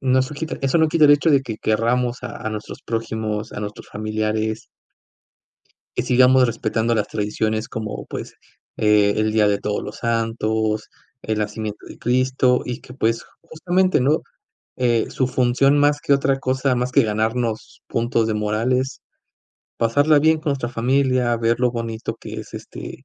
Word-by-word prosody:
No 130 -1 +3
sue 145 +3 -7
quita 160 +1 -4
Eso 135 +5 +2
no 160 - +5
quita 155 -1 +5
el - - +6
hecho 145 +3 +3
de 140 - +5
que 115 -5 -5
querramos 120 +3 0
a - - -6
a - - -1
nuestros 105 -1 -7
prójimos, 110 -1 -3
a - - -6
nuestros 105 0 -7
familiares 110 +1 -2 1.3
y - - 0
sigamos 125 +1 +5
respetando 115 0 0
las 105 - 0
tradiciones 110 +1 -2
como, 110 -1 -5
pues, - - -7 0.4
eh, 105 -1 +4
el 110 0 +1
Día 110 -1 +4
de 100 - +1
Todos 105 0 -2
los 105 - -7
Santos, 110 -2 -1 0.3
el 110 -1 -2
nacimiento 105 0 -4
de - - -11
Cristo, 130 +1 +2
y 125 - -5
que, 125 - -13
pues, 115 -2 0 0.2
justamente, 180 +3 +1
¿no?, 145 +5 +2 0.5
eh, 120 -3 +1
su 130 - 0
función, 130 +3 +3
más 145 0 +3
que - - -2
otra 135 -1 +1
cosa, 130 0 0
más 125 +1 -1
que 140 - +4
ganarnos 110 +1 -2
puntos 115 0 0
de 110 - 0
moral, 105 +4 0
es 130 +1 -1 0.8
pasarla 145 +6 +4
bien 160 +1 +4
con 155 -1 -2
nuestra 130 -4 -2
familia, 125 0 +1
ver 115 +1 +1
lo 125 -1 +3
bonito 115 -1 -4
que - - -9
es, - - -13
este, - - -9
120 Hz, 170 wpm, -21 LUFS, 110-130 Hz, 1.3 s, el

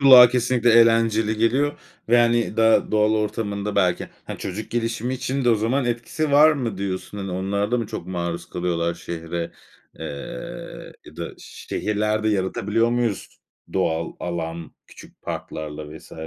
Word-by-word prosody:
Kulağa 130 -3 +10
kesinlikle 120 -1 +2
eğlenceli 115 -1 +4
geliyor 130 +6 +1 0.3
ve 120 +1 +6
hani 120 -2 +2
da 110 0 +4
doğal 105 0 +3
ortamında 105 -1 -2
belki, 90 -3 +2 0.2
ha, - - -7
çocuk 100 +3 -5
gelişimi 115 +2 -1
için 135 +1 -2
de 120 - +5
o 115 - +5
zaman 120 +5 0
etkisi 120 +6 -2
var 155 +2 +7
mı 120 -9 -3
diyorsun? 100 +1 -4
Hani 95 -1 -4
onlar 100 +3 -1
da 125 - +2
mı 115 - -2
çok - - -6
maruz 85 -1 -3
kalıyorlar 85 -1 -1
şehre, 85 0 -5 0.5
ııı, 70 -5 -7
ya - - -14
da - - -4
şehirlerde 105 +1 -2
yaratabiliyor 105 +3 +1
muyuz 120 -4 -2 0.3
doğal 80 +1 0
alan 85 -1 -4
küçük - - -16
parklarla 75 0 -6
vs? - - -17
105 Hz, 150 wpm, -23 LUFS, 90-120 Hz, 0.5 s, Kulağa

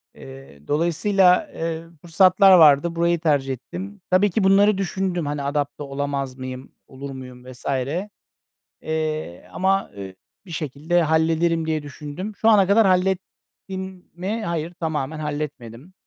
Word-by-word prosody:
Eee, 135 - -13
dolayısıyla, 180 +4 +2
eee, 165 0 -4 0.2
fırsatlar 185 +3 +5
vardı, 160 +1 +5
burayı 170 0 +1
tercih 145 -4 +1
ettim. 190 - -8
Tabii 195 +3 +4
ki 195 +2 0
bunları 200 +1 +4
düşündüm, 190 -3 -2
hani, 145 -1 -3
adapte 145 0 -2
olamaz 140 -1 -4
mıyım, 130 0 -8 0.2
olur 135 +1 -9
muyum, 125 -1 -10
vs. 125 - -15 1.2
eee, 155 - -4
ama, 195 +1 0
eee, 95 -2 -8 0.3
bir 180 - -12
şekilde 155 +2 -1
hallederim 160 +1 +1
diye 155 -2 -1
düşündüm. 150 +8 -7
Şu 225 - +3
ana 200 -4 +5
kadar 210 +3 +5
hallettim 190 0 -3
mi? 200 +6 -4
Hayır, 170 0 -3
tamamen 155 -2 -3
halletmedim 145 -1 -6
160 Hz, 130 wpm, -22 LUFS, 140-185 Hz, 1.2 s, fırsatlar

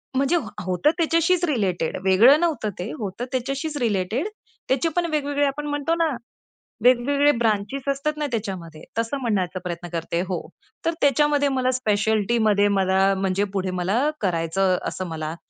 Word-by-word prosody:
म्हणजे 275 +5 +2
ह 235 - -4 0.2
होतं 185 +11 +2
त्याच्याशीच 335 +2 +2
रिलेटेड, 195 - -1
वेगळं 225 +11 +6
नव्हतं 315 -11 0
ते, 190 +5 -4
होतं 215 +2 -4
त्याच्याशीच 275 +4 -2
रिलेटेड. 225 - 0 0.4
त्याचे 270 +5 +2
पण 350 -1 +1
वेगवेगळे 290 -1 0
आपण 295 +2 -2
म्हणतो 290 +3 0
ना, 330 -1 +1 0.7
वेगवेगळे 280 +4 +4
ब्रांचेस 225 +4 -1
असतात 300 +2 -2
ना 300 - -1
त्याच्यामध्ये 185 -8 -5
तसं 230 +5 -1
म्हणायचा 190 -6 -1
प्रयत्न 175 0 -5
करते, 170 +1 -2
हो. 180 -3 -2 0.5
तर 330 - +2
त्याच्यामध्ये 285 +1 +3
मला 255 0 +2
स्पेशलिटीमध्ये 215 -2 +2
मला 190 +1 +3
म्हणजे 195 +1 0
पुढे 185 -1 -1
मला 195 +7 +1 0.2
करायचं 180 +1 +1
असं 185 -1 -4
मला 160 0 -4
230 Hz, 145 wpm, -23 LUFS, 190-285 Hz, 0.7 s, वेगळं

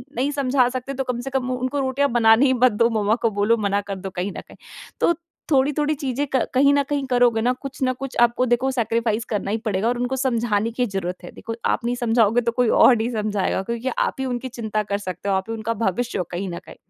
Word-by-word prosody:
नहीं 270 +4 0
समझा 270 -3 +2
सकते 255 +2 -5
तो 270 0 -2
कम 250 -2 -3
से 270 - -5
कम 260 -1 -1
उनको 255 +3 -2
रोटियाँ 275 +1 +1
बनाने 230 +2 +5
ही 260 - +3
मत 255 0 +4
दो, 230 +3 +2
मम्मा 215 -1 +1
को 230 - +3
बोलो 205 +3 +2
मना 200 -1 0
कर 200 -1 -6
दो 190 0 -6
कहीं 185 +2 -3
न - - -5
कहीं। - - -16 0.4
तो 340 - +3 0.4
थोड़ी-थोड़ी 295 +2 +2
चीज़ें 275 0 -2
क - - +4
कहीं 280 +2 +5
न 285 - +3
कहीं 285 -2 -1
करोगे 245 -2 +3
ना, 245 +2 +2
कुछ 265 +1 -9
न 255 - +2
कुछ 270 -1 -6
आपको 240 +1 +3
देखो 245 +2 +1
सैक्रिफ़ाइस 230 -2 0
करना 205 -2 -2
ही 220 - +1
पड़ेगा 205 0 0
और 245 +1 0
उनको 245 +2 -1
समझाने 230 -4 0
की 245 +2 0
ज़रूरत 190 -4 -4
है 175 - -9
देखो 230 - -7
आप - - 0
नहीं 240 +1 0
समझाओगे 230 -1 +2
तो 235 0 0
कोई 245 0 +1
और 255 - +6
नहीं 225 +2 -1
समझाएगा 210 -4 -1
क्योंकि 235 +4 -3
आप - - 0
ही 265 - -1
उनकी 250 0 -3
चिंता 220 -4 -3
कर 200 - +2
सकते 185 -1 -5
हो, 195 - +2
आप 190 - 0
भी - - -2
उनका 225 0 -2
भविष्य 230 +2 -1
हो 185 - 0
कहीं 185 +2 -3
न 170 - -5
कहीं। - - -12
235 Hz, 250 wpm, -22 LUFS, 215-260 Hz, 0.4 s, और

